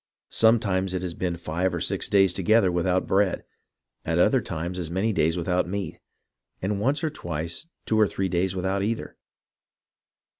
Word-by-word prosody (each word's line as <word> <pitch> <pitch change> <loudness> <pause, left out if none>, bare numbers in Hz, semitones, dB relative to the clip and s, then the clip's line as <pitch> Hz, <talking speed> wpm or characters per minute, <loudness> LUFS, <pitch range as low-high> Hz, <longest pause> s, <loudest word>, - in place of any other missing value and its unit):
Sometimes 100 -5 +3
it 90 - -2
has 90 -2 -3
been 85 0 -2
five 85 +2 -1
or - - -2
six - - -2
days 95 -3 +4
together 95 +1 +3
without 90 +1 +1
bread, 95 -1 +1 0.6
at - - -1
other - - +4
times 85 +3 -4
as 85 -3 -4
many 95 +6 0
days 80 -2 +2
without 90 +1 0
meat, 100 0 -4 0.6
and 100 +1 -2
once 140 +8 +1
or 155 - 0
twice 85 - -5 0.2
two 110 - +1
or 105 - +5
three 95 +2 -2
days 95 +1 0
without 95 +1 -1
either. 110 +3 -3
95 Hz, 165 wpm, -25 LUFS, 85-100 Hz, 0.6 s, or